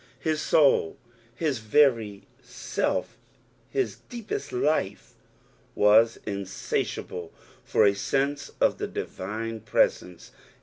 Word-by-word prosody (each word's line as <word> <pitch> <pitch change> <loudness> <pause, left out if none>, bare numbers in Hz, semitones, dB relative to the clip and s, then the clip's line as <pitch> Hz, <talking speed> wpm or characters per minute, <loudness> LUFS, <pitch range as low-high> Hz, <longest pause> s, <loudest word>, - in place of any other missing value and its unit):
His 155 -1 -1
amil, 140 - +3 0.4
his 145 -2 -1
very 110 -4 +2 0.2
self, - - -3 0.5
bis 400 - -1
deepest 225 -11 -5
life, 125 -6 -1 0.6
was 110 +2 +5
insatiahle 95 -3 -3 0.3
for - - +3
a 100 - +5
sense 140 +7 -1
of - - +2
the - - -2
divine 110 +4 -5
preKnce. 90 -4 0
115 Hz, 95 wpm, -26 LUFS, 100-145 Hz, 0.6 s, was